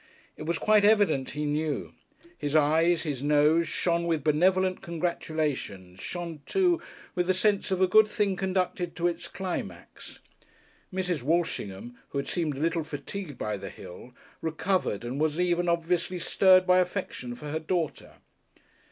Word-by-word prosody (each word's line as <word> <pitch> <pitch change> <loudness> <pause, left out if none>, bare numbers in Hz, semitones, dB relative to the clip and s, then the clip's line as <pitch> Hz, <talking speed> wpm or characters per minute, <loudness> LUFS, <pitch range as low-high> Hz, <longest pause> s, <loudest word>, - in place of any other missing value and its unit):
It 155 - -8
was 170 0 0
quite 215 +2 +4
evident 205 -11 +3
he 150 - -1
knew. 150 0 -2 0.4
His 145 -1 -3
eyes, 160 +3 +3
his 145 -6 -3
nose, 150 +3 +3
shone 170 -1 0
with 165 -3 0
benevolent 185 +4 +2
congratulations, 155 - -3
shone, 170 -4 -5
too, 360 -3 +2 0.3
with 180 -1 0
the 185 - +3
sense 200 +1 +1
of 190 -1 0
a - - +5
good 215 +3 +6
thing 205 -2 0
conducted 185 -2 -1
to 175 - -2
its 175 -1 -1
climax. 185 -2 -6 0.7
Mrs. 180 -4 -2
Walshingham, 120 - -2
who - - -5
had 140 - -2
seemed 160 -6 -1
a - - -5
little 165 0 +1
fatigued 150 - -7
by 105 -1 -2
the 100 0 -7
hill, 95 +7 -12 0.3
recovered, 160 - -1
and 130 +5 -3
was 155 +1 +1
even 175 -1 +1
obviously 170 +2 0
stirred 185 +1 +5
by 180 0 +5
affection 180 -9 -3
for 150 +4 -7
her 160 - -1
daughter. 160 -1 -3
170 Hz, 155 wpm, -28 LUFS, 150-185 Hz, 0.7 s, good